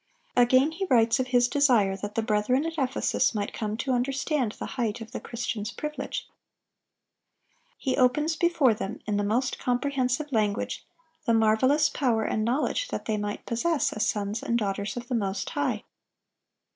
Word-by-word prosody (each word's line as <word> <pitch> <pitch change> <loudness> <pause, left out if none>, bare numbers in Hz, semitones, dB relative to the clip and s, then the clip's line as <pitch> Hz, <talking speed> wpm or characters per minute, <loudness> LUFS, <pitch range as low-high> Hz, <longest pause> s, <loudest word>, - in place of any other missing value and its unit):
(822) 245 - +5 0.2
Again 305 - -1
he 375 +4 -3
writes 230 -1 +4
of 255 - 0
his 245 -1 +3
desire 245 -9 +3
that 205 +2 -6
the 225 - +1
brethren 225 +6 +1
at 330 -1 -3
Ephesus 265 -3 +1
might 205 -1 -2
come 215 -1 -3
to 265 - -2
understand 260 -1 0
the - - -6
height 230 -3 -1
of 225 -1 -9
the - - -4
Christian's 225 -2 -4
privilege. 300 +4 -5 1.5
He 260 - -1
opens 295 +6 +2
before 335 -9 +3
them, 210 0 -5
in 210 -1 0
the 205 - +1
most 240 +6 0
comprehensive 255 +2 0
language, 210 -4 0 0.4
the 230 - +4
marvelous 260 +7 +4
power 245 -6 0
and 215 - -1
knowledge 285 - 0
that - - -5
they 215 -1 0
might 205 0 -4
possess 290 +7 0
as 215 - 0
sons 205 +1 -2
and 235 - 0
daughters 200 0 -2
of 245 0 -6
the 255 - -3
Most 195 -4 -1
High. 260 -7 -1
240 Hz, 170 wpm, -27 LUFS, 215-275 Hz, 1.5 s, 822